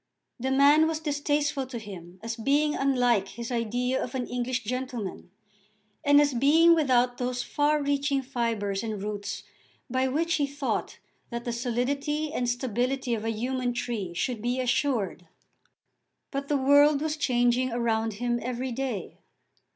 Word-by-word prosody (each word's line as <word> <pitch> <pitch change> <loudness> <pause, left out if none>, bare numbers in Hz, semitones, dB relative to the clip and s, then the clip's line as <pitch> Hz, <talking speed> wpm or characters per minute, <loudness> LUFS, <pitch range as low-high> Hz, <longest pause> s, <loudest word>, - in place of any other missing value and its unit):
The 260 +2 -1
man 285 +4 +5
was 320 -1 -1
distasteful 290 -2 0
to 255 -2 -6
him 185 -5 -10
as 230 0 -3
being 285 +6 +2
unlike 245 -8 +2
his 235 +4 -7
idea 245 +2 0
of 255 - -6
an 250 -2 -1
English 245 0 -2
gentleman, 245 -5 -4 0.7
and 285 0 +6
as 290 -1 +3
being 310 +7 +5
without 250 -6 +2
those 250 0 -1
far 295 +1 +1
reaching 280 -1 0
fibres 230 -6 -1
and 215 -3 -4
roots 205 -1 -4 0.5
by 260 +1 +1
which 320 +5 +1
he 285 -2 +1
thought 280 -1 -3 0.3
that 235 0 -5
the 240 - -2
solidity 275 +6 -1
and 245 -5 0
stability 245 +1 -1
of 220 -1 -2
a - - 0
human 245 +2 -1
tree 215 -8 -3
should 240 +4 -2
be 245 +3 -1
assured. 245 - 0 1.0
But 275 0 -3
the 290 - +2
world 285 +2 +5
was 310 0 -1
changing 250 -3 +2
around 225 -2 0
him 240 +3 -1
every 250 +1 -3
day. 240 -6 -4
250 Hz, 150 wpm, -27 LUFS, 235-280 Hz, 1.0 s, and